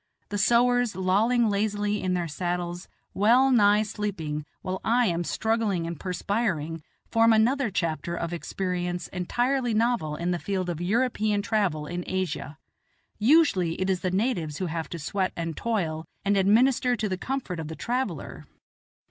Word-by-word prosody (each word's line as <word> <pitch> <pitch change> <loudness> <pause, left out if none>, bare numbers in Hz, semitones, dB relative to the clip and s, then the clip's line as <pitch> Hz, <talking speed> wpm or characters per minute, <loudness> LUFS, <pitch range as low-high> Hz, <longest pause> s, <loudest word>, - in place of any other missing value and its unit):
The 205 - -2
sowars 240 +1 +3
lolling 215 +6 +2
lazily 205 0 0
in 185 -1 0
their 175 -1 -1
saddles, 175 +2 -3 0.3
well 245 +7 +4
nigh 210 -3 +5
sleeping, 180 -9 -4 0.2
while 185 0 -3
I 240 +2 +3
am 175 -3 0
struggling 220 -3 0
and 165 -2 -5
perspiring, 180 -4 -2 0.3
form 230 0 +5
another 235 +3 +3
chapter 170 -2 -2
of 170 0 -3
experience 180 0 -3
entirely 240 +6 0
novel 225 -9 +1
in 170 +3 -2
the 175 - -1
field 185 -2 -2
of 170 0 -5
European 215 0 +1
travel 195 -9 0
in 175 +3 -4
Asia. 185 -5 -3 0.6
Usually 215 - +3
it 190 +1 +1
is 185 - 0
the 185 - -1
natives 185 - -1
who 185 - -2
have 165 -1 -4
to 170 - -5
sweat 185 +5 -2
and 165 -1 -3
toil 165 -9 -2 0.2
and 200 0 +3
administer 240 +6 +3
to 215 -2 -2
the 190 - -1
comfort 200 -4 -4
of 160 - -4
the 160 - -6
traveller. 250 +7 -3
195 Hz, 155 wpm, -26 LUFS, 175-225 Hz, 0.6 s, nigh